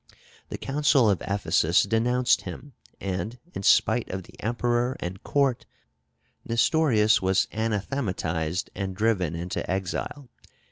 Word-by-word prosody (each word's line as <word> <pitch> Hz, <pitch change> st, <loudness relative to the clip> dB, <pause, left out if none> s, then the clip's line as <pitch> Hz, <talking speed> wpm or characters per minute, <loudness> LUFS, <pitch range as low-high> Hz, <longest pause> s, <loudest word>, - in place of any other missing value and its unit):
The -, -, -5 dB
Council 135 Hz, -5 st, +3 dB
of 95 Hz, -, -1 dB
Ephesus 85 Hz, -4 st, +2 dB
denounced 120 Hz, +4 st, +2 dB
him, 145 Hz, -2 st, -9 dB, 0.3 s
and, 100 Hz, +5 st, -3 dB, 0.2 s
in -, -, -5 dB
spite 110 Hz, +4 st, +3 dB
of 95 Hz, 0 st, -4 dB
the -, -, -17 dB
emperor 120 Hz, +2 st, 0 dB
and 95 Hz, +3 st, -6 dB
court, 140 Hz, -4 st, 0 dB, 0.8 s
Nestorius 115 Hz, -2 st, +3 dB
was 95 Hz, 0 st, +2 dB
anathematized 100 Hz, -, -2 dB
and 95 Hz, -1 st, -4 dB
driven 95 Hz, -6 st, +1 dB
into 90 Hz, +4 st, -3 dB
exile. 95 Hz, +9 st, -3 dB
105 Hz, 120 wpm, -26 LUFS, 95-120 Hz, 0.8 s, Council